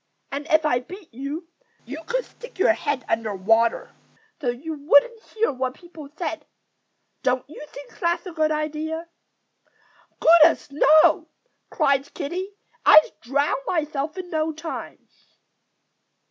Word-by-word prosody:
And 285 +2 -5
if 315 0 +3
I 245 -5 +2
beat 360 - -12
you, 285 +7 -6 0.4
you 290 +7 -8
could - - -1
stick 485 -3 -14
your 375 -3 +4
head 290 -5 -3
under 220 -2 -1
water, 225 +5 +1 0.5
so 270 - -3
you 280 +7 -4
wouldn't 300 +10 +3
hear 450 0 -1
what 260 -1 -3
people 335 -5 -12
said. 325 -3 -4 0.7
Don't 255 0 0
you 300 - -10
think 280 -3 -13
that's 340 +2 0
a 365 - -6
good 310 -1 0
idea?" 310 +2 -3 1.1
"Goodness, 325 -1 +5
no!" 310 +2 +5 0.4
cried 280 -3 +1
Kiddie. 370 +7 -4 0.3
"I'd 310 - +7
drown 280 +5 0
myself 305 -1 -2
in 360 -1 -7
no 315 0 0
time." 315 +1 -8
310 Hz, 130 wpm, -23 LUFS, 275-335 Hz, 1.1 s, I'd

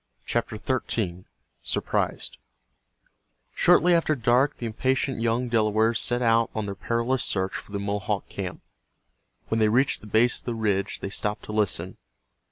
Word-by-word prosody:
CHAPTER 115 -2 -1
XIII—SURPRISED 105 -7 -3 1.1
Shortly 175 +2 +5
after 165 -2 +2
dark 125 +4 +2
the 120 - -5
impatient 130 +2 -1
young 120 +2 +1
Delawares 110 0 +2
set 120 0 +2
out 115 0 +3
on 110 -1 -2
their 100 - -4
perilous 115 +5 0
search 95 -1 -1
for - - -7
the 100 - -3
Mohawk 100 0 -2
camp. 90 -3 -6 0.9
When 110 - +1
they 110 -1 +4
reached 130 +5 +2
the 105 - -11
base 115 +3 +3
of - - -18
the 120 - -2
ridge 105 -3 -1
they - - -3
stopped 105 +1 -2
to - - -7
listen. 100 -4 -1
110 Hz, 150 wpm, -26 LUFS, 105-120 Hz, 1.1 s, Shortly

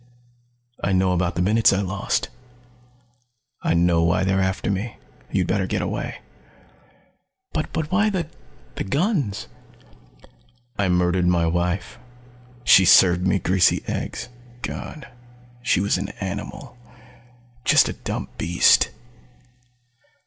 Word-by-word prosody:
"I 100 - +1
know 95 0 +2
about 90 0 0
the 90 - 0
minutes 110 +3 +4
I 95 - +1
lost. 95 0 -2 1.3
I - - +1
know 85 0 +3
why 85 +3 +2
they're 95 0 +1
after 95 +2 -1
me. 100 +5 -4 0.3
You'd - - +1
better - - 0
get - - -1
away." - - -4 1.3
"But 160 0 -3
why 210 +3 +3
the 185 -5 -2 0.5
the - - -2
guns?" 140 - -1 1.3
"I 100 -2 0
murdered 90 0 +2
my 85 -2 +2
wife. 90 +6 -2 0.6
She 95 - +7
served 90 0 +5
me 95 - +2
greasy 90 0 +2
eggs. - - -4 0.3
God 150 - -6 0.5
she 120 - +1
was 100 -1 +1
an 95 +1 -4
animal 105 +6 -6 0.9
just - - +5
a - - -3
dumb - - -5
beast!" 85 +2 +4
95 Hz, 120 wpm, -22 LUFS, 90-105 Hz, 1.3 s, She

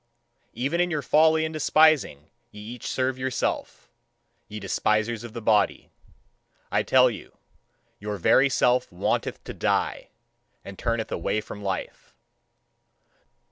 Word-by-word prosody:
Even 145 +8 0
in 180 - +1
your 150 -4 -2
folly 160 +3 +4
and 160 - -5
despising 155 - +2 0.2
ye 105 - -13
each 115 +3 -8
serve 130 0 -1
your 130 +1 -1
Self, 125 - -3 0.6
ye 105 0 -7
despisers 110 +3 0
of 120 -2 -9
the 115 -2 -7
body. 105 -2 +1 0.8
I - - +2
tell - - +4
you, - - -11 0.6
your 105 0 -4
very 135 +9 +4
Self 125 -1 +1
wanteth 90 - -2
to - - -7
die, - - -1 0.6
and 100 -1 -10
turneth 115 -2 -2
away 110 - -1
from 105 -1 -9
life. 95 -2 -5
120 Hz, 135 wpm, -25 LUFS, 105-140 Hz, 0.8 s, folly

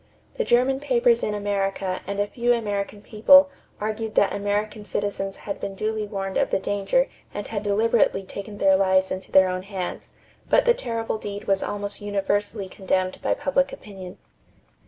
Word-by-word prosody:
The 485 - +1
German 265 - +3
papers 475 - +3
in 210 - -1
America 195 -2 -1
and 200 0 -3
a 205 - +2
few 240 +3 +1
American 205 -2 -3
people 280 +7 +6 0.3
argued 215 +1 -3
that 200 - +3
American 205 +1 -2
citizens 200 -1 -3
had 200 - -6
been 195 - -5
duly 215 +1 -2
warned 195 -2 -3
of - - +2
the - - +2
danger 205 - +1 0.3
and 205 - -4
had 205 -2 -3
deliberately 210 -1 +2
taken 200 +2 -8
their 195 -1 +4
lives 190 0 +3
into 185 0 -5
their 190 0 +6
own 185 0 -2
hands; 190 -2 -6 0.4
but - - +4
the 480 - +6
terrible 230 - -3
deed 205 0 -6
was 195 -2 +1
almost 205 0 -3
universally 205 0 -1
condemned 185 0 -1
by - - +1
public 275 -1 +1
opinion. 190 -3 -10
205 Hz, 170 wpm, -24 LUFS, 195-225 Hz, 0.4 s, people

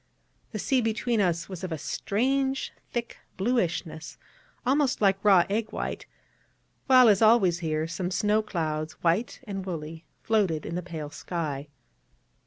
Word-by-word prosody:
The - - -4
sea 265 -3 +1
between 225 +1 0
was 180 0 -1
of 185 - -4
a 160 - -2
strange 265 - -1 0.2
thick 235 -1 -4 0.2
bluishness, 185 -7 -1 0.5
almost 275 +1 +2
like 195 -1 +2
raw 195 -4 +6
egg 220 +2 -1
white; - - -4 0.8
while, 255 -2 +7
as 205 -2 +5
always 215 -6 +5
here, 155 -2 -1
some 175 +2 -3
snow 210 +3 +2
clouds, 155 -6 -3
white 175 +12 +1
and 195 -5 -5
woolly, 165 -3 -6 0.2
floated 195 -9 +1
in 165 - -5
the 180 - -2
pale 160 -4 -7
sky. 150 -2 -4
190 Hz, 140 wpm, -27 LUFS, 165-225 Hz, 0.8 s, while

